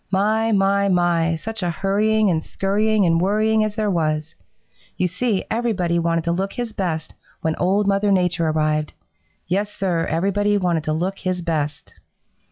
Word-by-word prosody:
My, 215 +4 +1
my, 200 0 +2
my, 170 -2 +2
such 220 +6 -6
a 175 - 0
hurrying 205 +4 +1
and 160 -2 -1
scurrying 210 +1 +1
and 165 -1 +2
worrying 215 +3 +2
as 215 -1 -2
there 215 -2 0
was! 155 -3 -1 0.6
You 185 - +1
see, 195 +3 -1
everybody 195 -8 0
wanted 165 0 0
to 170 - 0
look 190 +3 -2
his 240 -3 -4
best 160 -6 -3 0.3
when 160 0 0
Old 195 +3 +1
Mother 200 +1 +2
Nature 180 -3 +1
arrived, 155 -1 0 0.5
Yes, 200 +4 -1
Sir, 175 -5 -1
everybody 200 +5 +1
wanted 175 -5 0
to 155 - 0
look 185 +5 -2
his 185 -2 -2
best. 150 -3 -3
185 Hz, 165 wpm, -21 LUFS, 165-205 Hz, 0.6 s, my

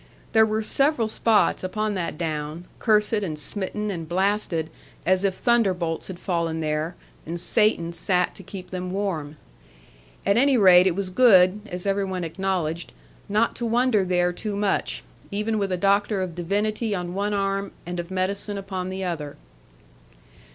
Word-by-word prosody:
There 220 -1 +5
were 215 0 -1
several 275 -1 +2
spots, 220 -2 +2
upon 215 +3 -1
that 175 -5 -3
Down, 155 0 -4
cursed 215 -1 +3
and 160 -6 -3
smitten, 205 +6 -3
and 165 -4 -6
blasted, 185 -3 0 0.3
as 185 +1 +3
if 195 -2 +1
thunderbolts 185 -9 +1
had 185 - -7
fallen 170 -3 -1
there, 155 +2 -2 0.3
and 170 +2 -3
Satan 175 -3 +2
sat 180 +2 +1
to - - -12
keep 185 0 -9
them 180 0 -4
warm. 170 -7 -3 0.9
At 200 - +3
any 270 +1 +4
rate 185 -3 +7
it 175 - +1
was 195 -1 -3
good 190 -3 +5
(as 180 0 -5
every 200 0 +1
one 185 -2 -3
acknowledged) 170 -1 -2 0.4
not 215 +3 +2
to 235 - -3
wander 235 -3 +3
there 180 -1 +1
too 210 +3 -4
much; 200 -1 -1 0.3
even 210 +2 -1
with 200 -1 -1
a 185 - 0
doctor 200 +1 +2
of 180 -2 -5
divinity 205 +5 -1
on 175 -1 -4
one 205 +2 -1
arm 195 0 -1
and 175 +1 -4
of 170 0 -5
medicine 195 +2 -2
upon 190 -2 -4
the 190 0 -4
other. 155 -5 -4
190 Hz, 165 wpm, -24 LUFS, 175-210 Hz, 0.9 s, rate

